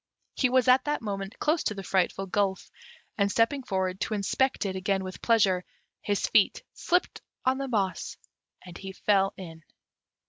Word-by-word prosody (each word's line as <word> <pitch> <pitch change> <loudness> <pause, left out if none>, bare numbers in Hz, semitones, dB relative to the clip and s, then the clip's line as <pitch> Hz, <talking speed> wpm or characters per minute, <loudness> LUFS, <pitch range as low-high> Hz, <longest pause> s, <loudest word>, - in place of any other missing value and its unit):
He 255 - +2
was 255 -1 +3
at 255 +1 +5
that 295 -5 -1
moment 195 -1 -4
close 315 +2 +1
to 215 - 0
the 195 - -6
frightful 190 +1 0
gulf, 195 0 -1 0.5
and 200 0 +3
stepping 230 +7 +2
forward 190 -5 -2
to 215 - -1
inspect 235 +5 0
it 190 -1 -2
again 195 +1 0
with 185 0 -8
pleasure, 195 -6 +3 0.4
his 205 -1 0
feet - - +3
slipped 360 +1 0 0.2
on 260 +1 +2
the 275 - -2
moss, 200 -6 -2 0.5
and 180 -2 -11
he 195 0 -7
fell 195 -1 +2
in. 165 -4 -9
200 Hz, 170 wpm, -28 LUFS, 190-250 Hz, 0.5 s, at